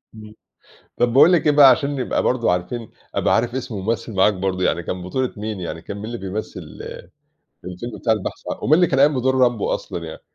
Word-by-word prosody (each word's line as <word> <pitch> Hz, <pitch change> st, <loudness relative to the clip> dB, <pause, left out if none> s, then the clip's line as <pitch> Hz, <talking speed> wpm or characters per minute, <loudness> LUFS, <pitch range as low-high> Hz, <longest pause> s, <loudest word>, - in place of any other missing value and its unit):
امم، 110 Hz, 0 st, -12 dB, 0.6 s
طب 120 Hz, -1 st, +1 dB
باقول 160 Hz, +7 st, +7 dB
لك 165 Hz, -, +2 dB
إيه 150 Hz, -, +5 dB
بقى 145 Hz, -2 st, +8 dB
عشان 140 Hz, +3 st, +2 dB
نبقى 130 Hz, -, -1 dB
برضه 120 Hz, -7 st, +1 dB
عارفين 90 Hz, +6 st, -3 dB, 0.2 s
أبقى -, -, +2 dB
عارف 120 Hz, +2 st, 0 dB
اسم 125 Hz, -4 st, -4 dB
الممثل 110 Hz, +3 st, -3 dB
معاك 95 Hz, +2 st, +4 dB
برضه، 95 Hz, -1 st, -2 dB
يعني 85 Hz, -1 st, 0 dB
كان 90 Hz, +1 st, -5 dB
بطولة 130 Hz, +8 st, -2 dB
مين 105 Hz, -2 st, -5 dB
يعني 85 Hz, -2 st, -6 dB
كان 100 Hz, -, -7 dB
مين 105 Hz, -, -6 dB
اللي 120 Hz, +1 st, -5 dB
بيمثل 100 Hz, +2 st, -5 dB, 1.1 s
الفيلم 90 Hz, +6 st, -7 dB
بتاع 115 Hz, -, +2 dB
البحث 105 Hz, -3 st, -5 dB
ع -, -, -5 dB
ومين 150 Hz, -, +3 dB
اللي 175 Hz, +1 st, +5 dB
كان 135 Hz, -, 0 dB
قايم 145 Hz, -2 st, +4 dB
بدور 130 Hz, +1 st, +1 dB
رامبو 120 Hz, -4 st, +2 dB
أصلًا 85 Hz, -1 st, -5 dB
يعني؟ 80 Hz, -, -9 dB
115 Hz, 215 wpm, -21 LUFS, 95-130 Hz, 1.1 s, بقى